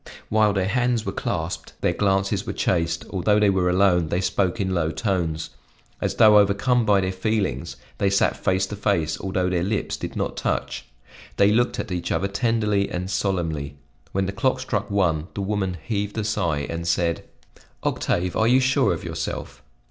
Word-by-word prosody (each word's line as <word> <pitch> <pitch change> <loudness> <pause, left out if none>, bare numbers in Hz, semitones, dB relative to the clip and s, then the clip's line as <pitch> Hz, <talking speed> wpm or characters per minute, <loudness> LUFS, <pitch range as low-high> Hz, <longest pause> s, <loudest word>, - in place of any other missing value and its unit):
While 110 -1 +3
their 95 -1 0
hands 125 +1 +1
were - - -2
clasped - - -4
their - - +2
glances 95 +1 0
were - - -2
chaste; 85 -2 0
although 105 +2 +2
they 105 -1 +4
were 90 -2 +1
alone, 90 -2 +3
they 85 - 0
spoke 95 +2 0
in 95 -2 0
low 85 -3 +1
tones. 85 -5 -2 0.5
As - - -1
though 105 -1 +7
overcome 105 +5 +2
by 100 -2 +4
their 95 0 -1
feelings 95 - -2 0.2
they 100 - +3
sat 100 - +2
face 95 +1 +2
to 105 - -6
face, 90 -7 0
although 95 -1 -1
their 90 -2 0
lips 105 +2 -2
did - - -6
not - - -2
touch. - - -2 0.5
They 100 +1 +5
looked 120 +3 +1
at 105 - -4
each 85 -1 -3
other 95 - +1
tenderly 105 -1 0
and 90 +2 -4
solemnly. 80 -9 -1 0.4
When 95 0 0
the 95 - -2
clock 130 +6 0
struck 130 - -2
one, 85 -6 +1
the 100 - -2
woman 95 -2 -1
heaved 105 -1 -2
a 110 - 0
sigh 85 -9 -1
and 85 0 -4
said: 85 0 0 0.6
"Octave, 90 +1 -1
are 110 - +3
you 125 +2 +5
sure 130 0 +2
of - - -9
yourself?" - - -5
95 Hz, 185 wpm, -23 LUFS, 90-105 Hz, 0.6 s, though